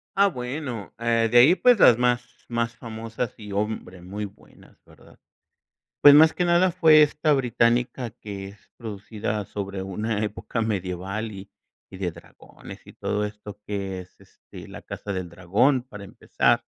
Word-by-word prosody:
Ah, 200 +1 +5
bueno, 125 - -5
eh, 115 -1 +1
de 120 - +5
ahí, 140 +9 +7
pues 245 +1 +4
las 120 - +7
más 125 0 +1 0.2
más 115 -1 -2
famosas 115 0 -5
y, 105 -2 -9
hombre, 100 -3 -3
muy 100 +4 -5
buenas, 100 - -17
¿verdad?, - - -20 0.8
pues, 145 - +10
más 160 +1 +7
que 180 - -1
nada 175 +1 +3
fue 160 -3 +6
esta 150 +1 +2
británica 120 -1 +1
que 100 -3 -8
es 100 +1 -16 0.2
producida 105 -1 -5
sobre 100 0 -5
una 105 +3 -3
época 110 +2 -4
medieval 100 +1 -3
y 100 0 -10 0.4
y - - -11
de 90 -2 -2
dragones 85 +1 -14
y - - -14
todo 105 - -2
esto, 105 -1 -9
que 95 -2 -4
es, 90 - -18
este, - - -14
La - - -10
casa 100 - -6
del 95 -2 -4
dragón, 105 - +1
para 105 -5 -11
empezar. 100 - 0
110 Hz, 160 wpm, -24 LUFS, 100-125 Hz, 0.8 s, pues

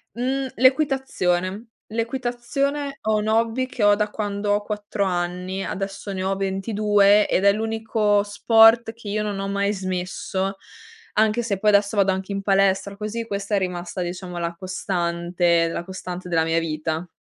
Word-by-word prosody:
Mhmm, 265 +3 -1
l'equitazione. 245 - +1 0.2
L'equitazione, 265 +4 -2
ho 220 0 +1
un 210 0 -1
hobby 230 +3 +1
che 250 -3 -4
ho 205 0 +6
da 210 0 -1
quando 205 -1 -2
ho 205 - +1
4 205 -1 -3
anni. 180 +1 -2
Adesso 195 +1 -5
ne 185 -1 -3
ho 195 +1 0
22 200 +1 +3
ed 190 - +1
è 200 - +7
l'unico 220 -1 +1
sport 225 +2 +5
che 230 -2 -13
io 210 +1 -1
non 205 -2 -3
ho 195 - -3
mai 200 0 0
smesso, 190 +1 -3 0.6
anche 220 +2 +2
se 205 -4 -1
poi 210 +1 +3
adesso 200 +1 +3
vado 195 -1 +4
anche 190 +1 -4
in 195 - -2
palestra. 195 0 +1
Così 215 +2 -4
questa 200 -1 -2
è - - +3
rimasta 180 -1 -4
diciamo 180 0 -5
la 170 0 -2
costante 175 -2 0
la 170 - -4
costante 180 0 -7
della 165 -2 +2
mia 165 +1 +1
vita. 160 +1 -3
200 Hz, 165 wpm, -23 LUFS, 185-220 Hz, 0.6 s, è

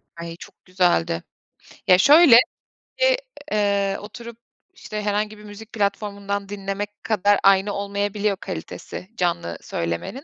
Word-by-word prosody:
Ay, 170 0 -7
çok - - -15
güzeldi. 175 - +1 0.6
Ya, 180 - +6
şöyle, 290 - +8 1.2
eee, 200 -2 +1
oturup, 230 +3 -10 0.4
işte 215 - -6
herhangi 210 +1 -1
bir 210 - -14
müzik 210 +1 -12
platformundan 200 -1 -2
dinlemek 205 +1 -5
kadar 205 -2 +2
aynı 195 +1 +4
olmayabiliyor 200 0 -1
kalitesi, 185 0 -7
canlı 170 - -1
söylemenin. 85 - -4
200 Hz, 110 wpm, -22 LUFS, 190-210 Hz, 1.2 s, şöyle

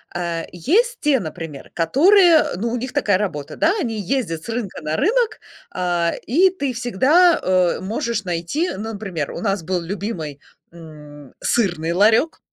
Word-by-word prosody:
А 170 -1 -3
есть 445 - +1
те, 290 -3 +3
например, 160 -5 -8
которые, 335 - +5
э, - - -3
ну, 230 +5 -2
у - - -1
них 255 +2 -5
такая 205 -10 +2
работа, 150 -9 -4
да? 330 +4 +3
Они 225 -5 -3
ездят 185 -6 -2
с - - -10
рынка 225 -7 -4
на 155 +1 -2
рынок, 450 - +1 0.3
а, 175 -2 0
и 360 +10 +4
ты 280 -8 -3
всегда, 265 - +3
а, 185 -2 +2
можешь 220 +2 -2
найти, 180 - -2
ну, 220 +3 -5
например, 185 -8 -4
у - - -6
нас 195 -4 -1
был 180 +1 -2
любимый, 170 -6 -5 0.3
м, 150 -4 -13
сырный 175 -7 0
ларёк. 220 - +3
200 Hz, 165 wpm, -20 LUFS, 170-270 Hz, 0.3 s, которые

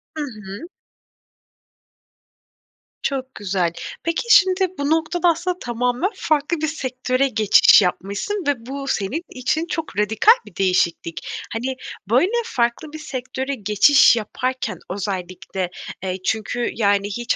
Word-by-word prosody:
Hı 305 - -2
hı. 215 - -8 2.3
Çok 265 -1 -3
güzel. 185 -4 -1 0.3
Peki, 335 0 -1
şimdi, 380 -3 +5
bu 285 0 -1
noktada, 325 +2 +2
aslında, 350 +2 -1
tamamen 245 - 0
farklı 310 +2 0
bir 315 - +1
sektöre 260 -2 -1
geçiş 215 -3 +6
yapmışsın 200 - -2
ve 290 - +4
bu 275 +1 -5
senin 220 - -1
için 265 +6 -1
çok 320 - -4
radikal 220 - +4
bir 185 - -15
değişiklik. 170 -3 0 0.3
Hani, 255 +4 -2 0.3
böyle, 305 - +3
farklı 245 - -1
bir 310 - -7
sektöre 265 -1 -4
geçiş 215 +5 +5
yaparken 255 +4 -3
özellikle, 185 -1 -4 0.3
eee, 185 -1 -2
çünkü, 225 +2 -1
yani, 200 -2 +2
hiç 235 +4 -1
250 Hz, 120 wpm, -21 LUFS, 205-305 Hz, 2.3 s, geçiş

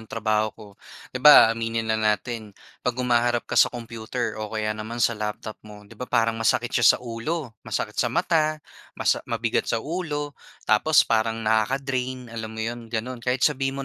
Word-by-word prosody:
ng 110 - -14
trabaho 110 -1 0
ko. 105 - -12 0.5
'Di 130 - -4
ba, 130 -5 +9
aminin 115 0 -2
na 110 0 0
natin 110 0 -2 0.2
'pag 125 0 -2
humaharap 120 -1 +1
ka - - -10
sa - - +6
computer 115 -1 -5
o 105 - -4
kaya 110 0 -2
naman 110 +2 -6
sa 115 0 +2
laptop 105 0 -5
mo, 105 -1 -13
'di 105 - -17
ba 125 +3 -8
parang 115 0 +1
masakit 115 - +1
siya - - +5
sa - - -13
ulo, 120 +3 -4
masakit - - -3
sa - - +1
mata, 155 -1 +1 0.4
masa - - +1
mabigat - - -1
sa - - +1
ulo, 150 -3 -3 0.3
tapos 140 +8 +4
parang 110 0 +1
nakaka-drain, 125 +2 -1
alam 110 -1 -5
mo 110 0 -5
'yon 120 0 -5
gano'n, 120 +2 -4
kahit 125 +2 0
sabihin 135 -1 0
115 Hz, 180 wpm, -24 LUFS, 110-130 Hz, 0.5 s, ba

